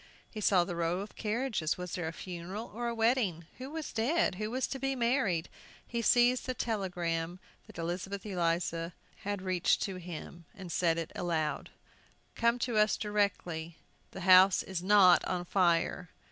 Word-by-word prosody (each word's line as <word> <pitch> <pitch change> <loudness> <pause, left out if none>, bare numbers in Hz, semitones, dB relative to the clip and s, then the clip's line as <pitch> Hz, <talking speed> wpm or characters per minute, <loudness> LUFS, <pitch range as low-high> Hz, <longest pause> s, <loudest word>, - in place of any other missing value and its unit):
He 215 - -6
saw 190 -3 +4
the 175 0 -5
row 170 +2 0
of 205 - -9
carriages. 220 - -1
Was 180 -1 -6
there 175 -3 -2
a - - -3
funeral, 185 +5 -7
or 240 +2 -3
a 235 - -2
wedding? 225 -8 +1
Who 260 +1 -6
was 315 0 -6
dead? 245 - +1
Who 215 - -1
was 255 +3 -1
to 270 - -4
be 270 +1 -1
married? 235 - +1 0.4
He 235 -1 -3
seized 245 +1 +3
the 255 - -2
telegram 180 -6 -2 0.3
that - - -13
Elizabeth 180 +4 -4
Eliza 170 -2 -1 0.3
reached 185 -3 0
to 195 -2 -4
him, 175 -1 -8
and 185 -4 -7
read 165 -2 +3
it 165 0 -4
aloud. 160 -4 -2 0.6
"Come 235 +1 +2
to 240 -3 -2
us 215 0 +4
directly 180 -6 -2 0.3
the 190 - -9
house 185 +1 +7
is 190 -3 -4
NOT 190 -2 +6
on 180 -1 -2
fire!" 175 -1 +1
185 Hz, 165 wpm, -31 LUFS, 170-225 Hz, 0.6 s, house